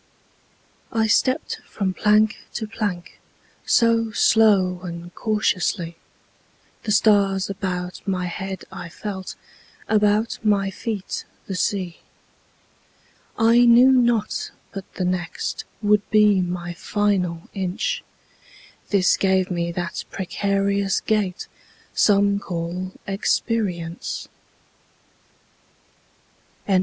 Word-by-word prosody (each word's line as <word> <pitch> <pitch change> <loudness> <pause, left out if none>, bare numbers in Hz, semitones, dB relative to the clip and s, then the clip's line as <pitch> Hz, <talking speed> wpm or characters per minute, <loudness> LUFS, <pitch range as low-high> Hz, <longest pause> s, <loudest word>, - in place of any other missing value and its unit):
I 225 -1 +2
stepped 255 +6 +1
from 190 -3 -2
plank 210 +2 +3 0.2
to 220 - -2
plank 205 -5 -4 0.5
So 230 -1 +3
slow 200 -5 +4
and 175 -1 -7
cautiously; 185 -5 0 0.9
The 215 - -1
stars 200 -2 +3
about 180 -2 -4
my 185 -2 0
head 190 +1 -5
I 175 - -7
felt, 190 +1 -6 0.5
About 210 +1 +2
my 200 -2 +2
feet 205 -1 -4 0.2
the 195 - -5
sea. 185 -1 -1 1.4
I 230 +1 +5
knew 240 +2 +7
not 240 -4 +2 0.2
but 195 -1 -8
the 185 - -1
next 180 -1 -3 0.2
Would 210 0 +3
be 210 -3 +5
my 175 -1 -3
final 180 -3 0
inch, 200 - -2 0.9
This 195 -3 +4
gave 190 -1 +2
me 170 -1 -1
that 175 0 -4
precarious 200 +1 0
gait 205 -4 -1 0.5
Some 200 -1 +3
call 180 0 -4
experience. 195 -4 -2 2.4
LIV. 190 -2 +4
195 Hz, 95 wpm, -23 LUFS, 180-215 Hz, 2.4 s, knew